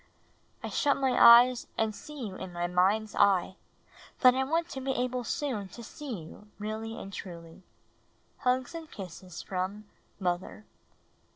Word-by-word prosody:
I - - -3
shut 285 -2 +2
my 265 -1 +1
eyes 240 +1 +8
and 220 -1 +1
see 290 +3 -8
you 200 - -6
in 185 -1 -7
my 175 0 -2
mind^s 195 +5 +2
eye, 190 -2 +3 0.7
hut 255 -1 +9
I 265 +1 +1
want 330 +5 0
to 270 - -5
he 265 0 -1
ahle 250 0 -4
soon 235 -5 -2
to 235 +5 -11
see 240 - -7
you 205 +6 -13
really 220 +2 -5
and 195 - -8
truly. 170 -2 -9 0.8
Hugs 255 +2 0
and 325 -2 -7
kisses 180 - -9
from 190 +3 -4 0.3
Mother. 180 +3 -3
215 Hz, 155 wpm, -29 LUFS, 185-255 Hz, 0.8 s, hut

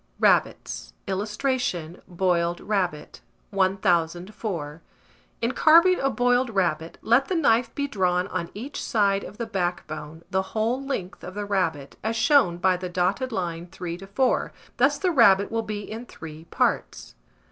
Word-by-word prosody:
RABBITS. - - +1
[Illustration: 200 - -2
BOILED 175 -1 0
RABBIT.] 180 -8 -2 0.3
1004. 180 -3 -1 0.6
In 235 - +2
carving 335 +6 +6
a 270 - +1
boiled 245 0 +2
rabbit, 170 -6 -1
let 240 +4 +3
the 375 - -1
knife 235 -7 +2
be 285 - -1
drawn 180 -7 +1
on 170 -2 -3
each 250 +8 -6
side 200 -3 +2
of 205 - -10
the 235 - -3
backbone, 165 -6 -4
the 190 -1 +2 0.2
whole 235 +5 0
length 210 -10 -4
of 185 +1 -8
the 205 0 -3
rabbit, 165 -9 -1
as 225 +1 -1
shown 225 - +4
by 185 +1 +2
the 180 0 -5
dotted 185 +8 0
line 175 -4 -3
3 180 -2 -6
to 195 - -10
4: 245 +6 +1 0.3
thus - - +3
the 370 -2 +1
rabbit 200 - +5
will 225 0 0
be 215 -2 -4
in 225 +4 -8
three 160 0 -10
parts. - - -1
195 Hz, 150 wpm, -25 LUFS, 175-230 Hz, 0.6 s, carving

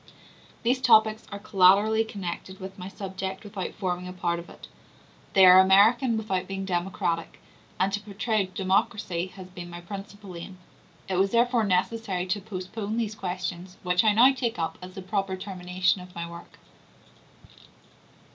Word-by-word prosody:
These 250 +2 +1
topics 220 -3 +4
are 200 - -4
collaterally 200 +3 +4
connected 190 -3 -6
with 190 0 -9
my 180 - -6
subject 190 0 -6
without 200 -3 -6
forming 180 -2 -3
a 180 - -7
part 170 -1 -1
of 170 - -11
it; - - -12 0.7
they 190 -1 +7
are 185 0 +9
American 220 +6 +5
without 190 -4 -2
being 195 0 -4
democratic; 175 -2 -2 0.4
and 195 +1 +1
to 205 - 0
portray 210 0 -1
democracy 185 -1 0
has 190 -1 -9
been 175 -1 -9
my 175 0 -8
principal 195 +1 -9
aim. 175 +2 -9 0.5
It 185 - -1
was 195 +1 +3
therefore 235 0 +2
necessary 190 0 0
to 200 +3 -2
postpone 205 +2 -5
these 220 -2 -1
questions, 180 -1 -5
which 180 0 +2
I 215 -1 +4
now 250 +5 +6
take 245 -5 -2
up 165 -1 -3
as 185 0 -10
the 190 - -7
proper 195 0 -1
termination 185 -1 -1
of 180 0 -13
my 170 0 -4
work. 170 0 -12
190 Hz, 160 wpm, -26 LUFS, 180-210 Hz, 0.7 s, are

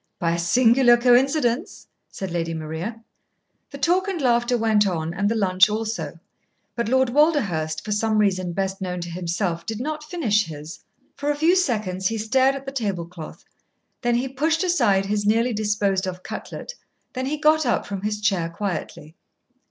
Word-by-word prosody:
"By 170 -1 0
a 170 - -2
singular 240 +6 +5
coincidence," 250 +3 +2 0.2
said 190 -2 -6
Lady 165 -1 -2
Maria. 160 +9 -5 0.7
The 280 - -9
talk 360 +6 +1
and 380 -4 -2
laughter 240 -2 +2
went 215 -2 +3
on, 165 -3 -2
and 200 +3 0
the 230 - 0
lunch 190 -2 +4
also, 220 -4 -3 0.6
but 235 -2 -2
Lord 260 0 +3
Walderhurst, 210 - +1
for 215 - -4
some 215 +1 +1
reason 185 -4 +1
best 195 +1 -2
known 180 -1 -3
to 170 0 -6
himself, 170 -1 -2
did 220 -1 -5
not 305 +3 -4
finish 245 - 0
his. 155 0 -9 0.3
For 285 +1 -3
a 295 - +1
few 320 +5 +3
seconds 210 - 0
he 225 - -2
stared 260 +5 +2
at 275 0 -8
the 270 - -5
table 200 -10 -2
cloth, 170 -2 -11 0.6
then 240 -1 +1
he 250 +3 0
pushed 310 +6 0
aside 235 - +2
his 205 +1 -1
nearly 230 +3 +2
disposed 205 -3 0
of 180 0 -6
cutlet, - - -7 0.4
then 260 -1 -3
he 300 +2 -2
got 310 -1 +3
up 240 - +1
from 200 -2 -5
his 210 +1 -2
chair 195 -5 0
quietly. 170 -4 -5
215 Hz, 175 wpm, -23 LUFS, 185-260 Hz, 0.7 s, singular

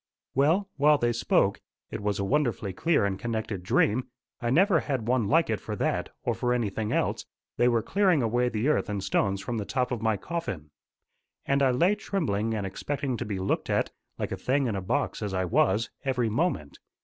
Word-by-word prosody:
Well, 160 +9 +3
while 150 +1 +5
they 120 -3 +1
spoke 100 -4 +2 0.3
it - - -4
was 100 -1 -1
a 100 - -1
wonderfully 120 -7 0
clear 160 - +2
and 95 -1 -2
connected 110 -4 -3
dream: 105 +7 +2 0.3
I 120 - -1
never 175 - +4
had 130 -7 -3
one 120 -4 +2
like 165 +6 +3
it 110 - 0
for - - -5
that, - - -1
or - - +1
for 125 0 0
anything 110 -2 -2
else - - 0 0.3
they 120 - +4
were 115 -2 +2
clearing 185 - +2
away 120 +2 +1
the 110 +3 -1
earth 150 - +1
and 100 -2 -2
stones 100 0 0
from 115 +3 -3
the - - -2
top 125 +3 -1
of 120 -3 -2
my 110 -2 +1
coffin. 95 - -5 0.7
And 140 0 +2
I 135 - +5
lay 170 +11 +3
trembling 115 - -1
and 105 -2 -2
expecting 135 +7 -3
to 120 - -4
be 105 -3 -3
looked 95 +1 -1
at, - - +1 0.3
like - - -3
a - - -2
thing 135 +2 +1
in 115 -5 -1
a 95 - -2
box 95 - -1
as 100 -2 -2
I 95 0 0
was, 95 +5 +2
every 125 -4 0
moment. 110 - -1
120 Hz, 210 wpm, -27 LUFS, 100-140 Hz, 0.7 s, while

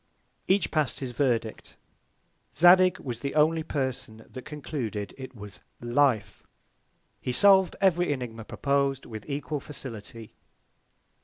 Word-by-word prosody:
Each 195 +1 +2
pass'd 150 -7 0
his 130 -2 -4
Verdict. 120 -3 -2 0.8
Zadig 180 +1 +6
was 120 -4 -6
the 140 0 -4
only 160 +2 +3
Person 130 -7 -4
that 130 - -10
concluded 130 -9 -5
it 130 -1 -10
was 100 -4 -10 0.2
LIFE. 120 -2 +1 0.8
He 125 - -2
solv'd 190 +7 +5
every 180 -3 +3
Ænigma 120 -5 -4
propos'd, 140 -1 0
with 110 +3 -9
equal 145 +1 -3
Facility. 115 -5 -9
135 Hz, 120 wpm, -27 LUFS, 115-150 Hz, 0.8 s, Zadig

